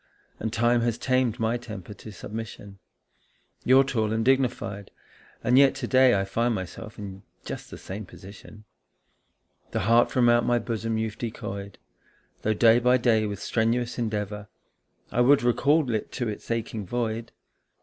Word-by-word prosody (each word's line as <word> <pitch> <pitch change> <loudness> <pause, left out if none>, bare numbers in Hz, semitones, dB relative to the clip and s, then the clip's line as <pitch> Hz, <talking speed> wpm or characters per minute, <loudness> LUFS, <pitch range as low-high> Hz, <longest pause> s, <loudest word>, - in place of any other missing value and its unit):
And 110 - -3
time 120 +1 +2
has 115 -1 0
tamed 130 -3 0
my 115 +1 +1
temper 110 -5 -9
to 110 +2 -11
submission. 105 -1 -8 0.8
You're 130 +2 +6
tall 110 -5 -1
and 110 0 0
dignified, 125 -7 0 0.5
and 125 +2 +5
yet 140 -1 +5
to 135 -2 -4
day 130 -4 +4
I 95 - -1
find 115 +4 0
myself 105 +4 -7
in 100 -2 -8 0.2
just - - -7
the - - -9
same 100 +1 -7
position. 100 +3 -13 1.1
The - - -2
heart 115 +4 +4
from 125 -2 +2
out 120 0 +4
my 120 - +2
bosom 115 -1 -2
you've 110 -1 -3
decoyed, 100 -4 -6 0.6
Though 110 0 0
day 115 +2 +5
by 125 +1 +4
day 115 -3 +2
with 100 -1 -5
strenuous 120 +2 0
endeavour 105 -2 -3 0.6
I 120 - +2
would 135 +1 +5
recall 140 +5 +3
it 110 - -3
to 125 -2 -2
its 105 - -6
aching 115 -3 -3
void. 115 0 -3
115 Hz, 160 wpm, -26 LUFS, 105-120 Hz, 1.1 s, You're